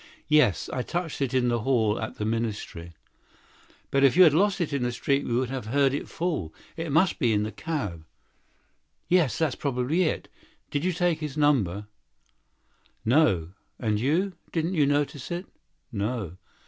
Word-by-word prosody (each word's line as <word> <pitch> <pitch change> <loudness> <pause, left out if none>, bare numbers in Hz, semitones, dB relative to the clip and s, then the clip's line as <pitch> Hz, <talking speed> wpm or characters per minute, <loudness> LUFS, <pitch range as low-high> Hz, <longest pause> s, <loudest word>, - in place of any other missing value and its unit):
"Yes, 150 - +4
I 130 - -1
felt 170 +2 -3
it 135 -3 0
in 125 -2 +2
the 120 - +1
vestibule 110 -3 +1
of 110 - -5
the 105 - -2
minister's 110 -6 -3
house." 85 - -15 1.0
"But 135 0 +3
if 135 +4 +5
you 185 - +10
had 160 -5 +6
lost 195 +4 +2
it 160 -4 -1
in 140 - 0
the 125 0 0
street 140 +3 0
we 120 - -1
should 130 -1 -3
have 130 -5 -4
heard 135 +2 +2
it 145 - -4
fall. 160 - -2 0.2
It 165 -2 -4
must 165 +6 +3
be 120 - +2
in 105 0 +1
the 110 - -3
cab." 115 - -4 1.0
"Yes, 170 - +2
probably. 140 +7 0 0.5
Did 145 +1 -1
you 185 - +2
take 175 -2 +1
his 150 -2 -5
number?" 105 - +2 1.2
"No. 110 - +3 0.3
And 105 -3 0
you—didn't 165 - -1
you 150 -5 +3
notice 145 -1 -1
it?" 175 +2 -4 0.5
"No." 100 -4 -3
135 Hz, 165 wpm, -26 LUFS, 110-160 Hz, 1.2 s, you